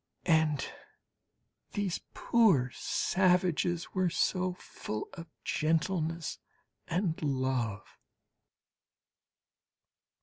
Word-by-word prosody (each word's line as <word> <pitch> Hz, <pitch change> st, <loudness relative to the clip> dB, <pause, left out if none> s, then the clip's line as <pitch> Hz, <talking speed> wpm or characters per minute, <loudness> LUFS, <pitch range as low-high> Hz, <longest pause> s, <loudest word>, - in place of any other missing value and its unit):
And 160 Hz, -4 st, +3 dB, 1.1 s
these 200 Hz, -4 st, -1 dB
poor 190 Hz, -, +4 dB
savages 180 Hz, -2 st, +1 dB
were 185 Hz, -2 st, +2 dB
so 185 Hz, +2 st, +1 dB
full 110 Hz, -10 st, -6 dB
of 170 Hz, -2 st, -8 dB, 0.2 s
gentleness 165 Hz, 0 st, 0 dB, 0.5 s
and 175 Hz, -1 st, 0 dB
love! 130 Hz, -7 st, -1 dB
165 Hz, 65 wpm, -31 LUFS, 150-185 Hz, 1.1 s, poor